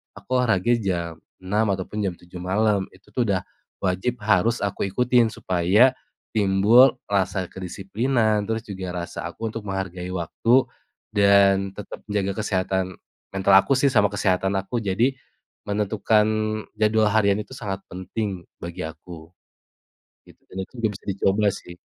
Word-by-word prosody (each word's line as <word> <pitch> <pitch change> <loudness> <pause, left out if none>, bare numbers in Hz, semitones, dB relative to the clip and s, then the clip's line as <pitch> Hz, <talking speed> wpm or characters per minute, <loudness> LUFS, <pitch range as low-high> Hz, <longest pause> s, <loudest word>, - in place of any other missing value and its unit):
aku 100 -1 -14
olahraga 110 -3 +2
jam 85 -5 -3 0.2
6:00 105 +3 0
ataupun 100 +2 -2
jam 95 -3 -1
7:00 90 0 -11
malam, 100 +1 +1
itu 95 +2 -22
tuh 125 - 0
udah 95 -3 0 0.3
wajib 95 +7 -1
harus 110 +3 +3
aku 100 -1 -2
ikutin 120 +2 +3
supaya 100 +6 +3 0.4
timbul 110 +6 +5
rasa 95 -1 0
kedisiplinan, 105 +5 -1
terus 115 +1 -2
juga 95 -3 -6 0.2
rasa - - -7
aku 110 +6 -7
untuk 115 - -4
menghargai 95 -3 -4
waktu 105 +8 +2 0.5
dan 100 -1 +4
tetap 105 - -8
menjaga 100 0 -1
kesehatan 95 -2 -1 0.3
mental 95 0 +2
aku 135 - +1
sih 135 - +2
sama 105 -2 +4
kesehatan 95 -1 0
aku. 100 +5 -2
Jadi 115 +6 +1 0.6
menentukan 105 +1 +2 0.5
jadwal 110 0 +2
harian 100 -2 +3
itu 105 +4 -7
sangat 100 -6 -5
penting 95 +1 -4 0.2
bagi 85 0 -7
aku 80 0 -9 1.0
gitu, - - -18
dan 95 +1 -5
itu - - -11
juga 115 -1 +1
bisa 100 - -12
dicoba 100 +2 +1
sih. 90 -2 -9
100 Hz, 145 wpm, -24 LUFS, 95-110 Hz, 1.0 s, timbul